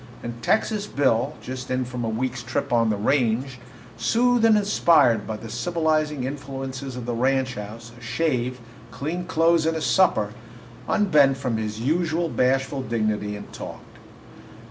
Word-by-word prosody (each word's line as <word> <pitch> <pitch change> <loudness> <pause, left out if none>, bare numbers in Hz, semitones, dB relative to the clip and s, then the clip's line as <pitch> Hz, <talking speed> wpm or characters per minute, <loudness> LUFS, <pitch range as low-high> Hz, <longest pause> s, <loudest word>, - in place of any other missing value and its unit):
And 120 0 -6
Texas 210 - +1
Bill, 130 - +1
just 130 0 -6
in 130 0 0
from 125 -1 -5
a 115 - -1
week's 125 +2 -2
trip 120 +2 -2
on 115 -1 +3
the 105 - 0
range, 125 +2 0 0.4
soothed 245 0 +2
and 220 -1 +6
inspired 150 - +3
by 110 - -3
the 115 - -9
civilizing 155 +2 0
influences 135 -1 -5
of 125 -2 -6
the 120 - -2
ranch 130 +2 +1
house, 110 +2 -8
a 120 - -16
shave, 125 -1 -1 0.3
clean 165 +8 -4
clothes, 165 -1 +3
and 165 - +1
his 160 - -2
supper, 110 - +3 0.6
unbent 150 -10 +4
from 125 -4 -2
his 110 0 -4
usual 165 +5 0
bashful 135 +1 +1
dignity 110 -3 -1
and 105 - -10
talked. - - -9
130 Hz, 155 wpm, -24 LUFS, 115-155 Hz, 0.6 s, and